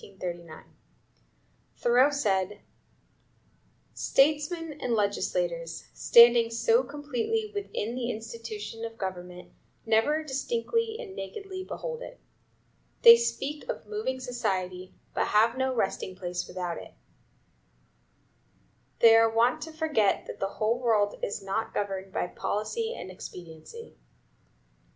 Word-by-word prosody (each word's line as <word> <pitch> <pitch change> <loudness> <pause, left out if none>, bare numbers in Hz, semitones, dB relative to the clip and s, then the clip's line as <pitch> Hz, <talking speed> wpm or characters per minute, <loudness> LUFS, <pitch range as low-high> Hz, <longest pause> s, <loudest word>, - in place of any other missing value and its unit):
Thoreau 245 +4 +4
said: 205 -7 0 1.3
"Statesmen 300 +2 +1
and 240 -2 0
legislators, - - -1
standing 235 -1 +7
so 455 - +3
completely 295 - -3
within 395 - -3
the 245 -1 -3
institution 225 -1 -6
(of 225 0 -6
government) 180 -2 -6 0.3
never 225 +8 +2
distinctly 455 - -1
and 415 -6 -8
nakedly 375 - -6
behold 485 +5 -6
it. - - -9 0.8
They 465 0 +12
speak 305 -10 -3
of - - -4
moving 420 -12 -3
society, 185 -7 -3 0.2
but - - 0
have 225 +3 +4
no 260 0 0
resting 190 -3 -1
place 180 -1 -4
without 175 -2 -4
it. - - -12 2.1
They 225 -1 +9
are 225 0 +6
wont 230 +2 +2
to 320 - -6
forget 310 -11 +1
that - - -8
the 195 - -1
world 220 -2 +1
is 200 - -3
not 195 +3 -3
governed 195 -1 -3
by - - -1
policy 445 - -3
and 185 - -8
expediency. 180 - -11
235 Hz, 110 wpm, -28 LUFS, 205-320 Hz, 2.1 s, They